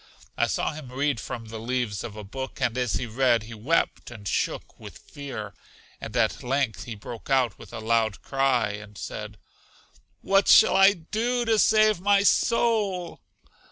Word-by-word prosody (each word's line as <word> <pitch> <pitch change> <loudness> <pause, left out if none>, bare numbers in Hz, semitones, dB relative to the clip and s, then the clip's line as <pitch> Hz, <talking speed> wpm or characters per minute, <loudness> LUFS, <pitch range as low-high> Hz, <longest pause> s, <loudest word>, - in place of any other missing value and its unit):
I - - +1
saw - - -1
him 150 -5 -9
read 140 -1 0
from 115 +2 -6
the 110 0 -7
leaves 115 -3 -2
of 105 - -7
a 105 - -8
book, 130 +7 -7
and 125 -3 0
as 125 -5 -1
he 95 - -1
read, 120 -1 +2
he 115 +1 -10
wept 125 +10 -1
and 105 -4 -9
shook - - -2
with - - -11
fear; 130 -8 -8 0.5
and - - -5
at - - +1
length 130 -3 -1
he 120 - -6
broke 110 +4 -10
out 130 -6 +1
with - - -12
a 115 - -7
loud 110 -1 0
cry, 135 -6 +1
and 105 0 -10
said, - - -7 0.8
What 195 0 +2
shall - - +7
I 195 +1 +7
do 230 +8 -2
to 225 -1 +2
save 215 -4 +4
my 200 0 +4
soul? 205 -6 +1
130 Hz, 175 wpm, -25 LUFS, 110-180 Hz, 0.8 s, shall